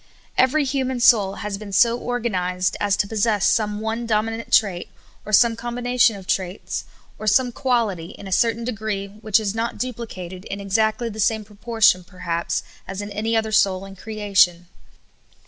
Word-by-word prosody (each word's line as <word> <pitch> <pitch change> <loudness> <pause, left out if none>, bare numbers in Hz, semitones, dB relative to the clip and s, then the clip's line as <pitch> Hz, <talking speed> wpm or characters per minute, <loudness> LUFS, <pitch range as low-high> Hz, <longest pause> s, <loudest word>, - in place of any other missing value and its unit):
EVERY 260 +4 +3
human 260 -1 -1
soul 220 -6 +4
has 200 -1 -3
been 210 -2 -8
so 230 +4 +4
organized 185 -8 -1
as 205 -1 +1
to 205 - +1
pos 220 +1 -4
sess 210 -3 +2
some 210 -2 +1
one 225 +2 -3
dominant 225 +1 -1
trait, 190 -5 +2 0.4
or - - -5
some 230 +2 +5
combination 240 0 +1
of 195 -2 -10
traits, 185 +1 -3 0.3
or 215 - -5
some 250 +4 +3
quaht}^ 225 -10 -1
in - - -11
a - - -8
certain 230 +4 +2
degree 215 -4 -3
which 215 +1 +1
is 205 -2 -2
not 225 +1 -2
dupHcated 195 -7 -6
in 200 - -5
exactly 220 +4 0
the 220 0 -9
same 220 0 +1
proportion, 215 -2 +2
perhaps, 175 -2 -3 0.2
as 195 +1 -5
in 205 - -7
any 220 +2 0
other 220 0 -1
soul 195 -2 +2
in 195 0 -11
creation. 200 -4 +1
215 Hz, 170 wpm, -22 LUFS, 195-230 Hz, 0.4 s, some